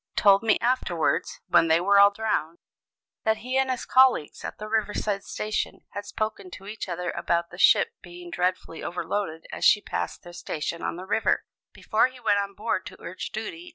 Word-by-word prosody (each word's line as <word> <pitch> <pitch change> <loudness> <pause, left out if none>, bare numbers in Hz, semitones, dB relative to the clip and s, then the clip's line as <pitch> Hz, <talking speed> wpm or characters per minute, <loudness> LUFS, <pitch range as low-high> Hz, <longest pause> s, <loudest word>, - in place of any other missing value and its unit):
told 200 -1 +5
me 220 -1 +3
afterwards 230 -9 0
(when 165 - +4
they 160 +1 +4
were 200 +3 +4
all 200 0 +9
drowned) 200 -6 -2 0.7
that 220 -1 +2
he 255 +1 -2
and 265 0 +1
his 255 -2 -2
colleagues 255 - +3
at - - -6
the 215 - -7
river 215 -1 0
side 200 -2 -1
station 215 0 -3
had 205 0 -6
spoken 215 -3 -4
to 190 - -11
each 210 -1 -6
other 180 0 -3
about 170 0 -1
the 180 - -10
ship - - +5
being 175 0 -11
dreadfully 180 -2 -2
overloaded 170 -2 -3
as - - -6
she 210 - +6
passed - - -4
their 175 -1 -11
station 165 0 -4
on - - -2
the 180 +2 -8
river, 215 +3 +1 0.3
before 220 +3 +2
he 255 -1 -14
went 210 -4 +2
on 200 0 -4
board 210 -3 -1
to - - -11
urge 180 +2 -6
duty 330 +12 -6
200 Hz, 195 wpm, -26 LUFS, 175-220 Hz, 0.7 s, all